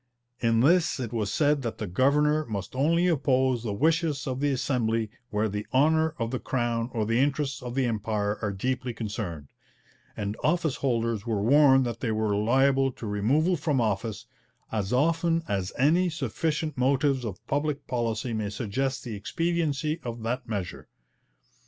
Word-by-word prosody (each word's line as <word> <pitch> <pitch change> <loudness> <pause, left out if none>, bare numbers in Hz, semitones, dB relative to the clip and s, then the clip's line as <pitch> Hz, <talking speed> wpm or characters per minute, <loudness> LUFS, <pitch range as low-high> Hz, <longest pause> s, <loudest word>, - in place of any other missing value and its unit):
In 115 -1 +2
this 170 +3 +3
it 120 -3 -4
was 105 -3 -1
said 145 +1 +2
that 115 -3 -4
'the 110 - -3
governor 150 +9 +2
must 100 +1 -5
only 165 +6 +2
oppose 130 -6 +2
the 110 -2 -3
wishes 155 +4 +1
of 130 -2 -3
the 145 +1 +1
Assembly 120 -5 0 0.2
where 105 +1 0
the 105 +1 -4
honour 160 +3 +3
of 115 0 -2
the 130 - -2
Crown, 120 -2 -1
or 110 -3 -1
the 115 +2 +1
interests 140 -1 0
of 125 -1 -6
the 135 -1 +2
Empire, 105 -2 -1
are 105 -3 -1
deeply 125 +4 -2
concerned,' 100 - -5 0.7
and 100 0 -3
office 160 -3 +1
holders 115 -4 -1
were 105 -3 0
warned 135 +1 +5
that 120 -1 -4
they 115 - -1
were 110 -1 0
liable 135 +5 +3
to 115 - -9
removal 130 - +2
from 150 -4 0
office 110 -1 -1 0.5
'as 105 -3 -2
often 165 +5 +2
as 95 -4 -2
any 170 +7 +3
sufficient 155 0 -2
motives 135 0 +2
of 100 -5 -6
public 145 +1 -1
policy 115 -1 -2
may 110 -2 -2
suggest 130 +5 -2
the 120 - -6
expediency 155 +5 -1
of 120 -2 -6
that 125 +2 -3
measure.' 100 -5 -4
125 Hz, 165 wpm, -27 LUFS, 110-145 Hz, 0.7 s, warned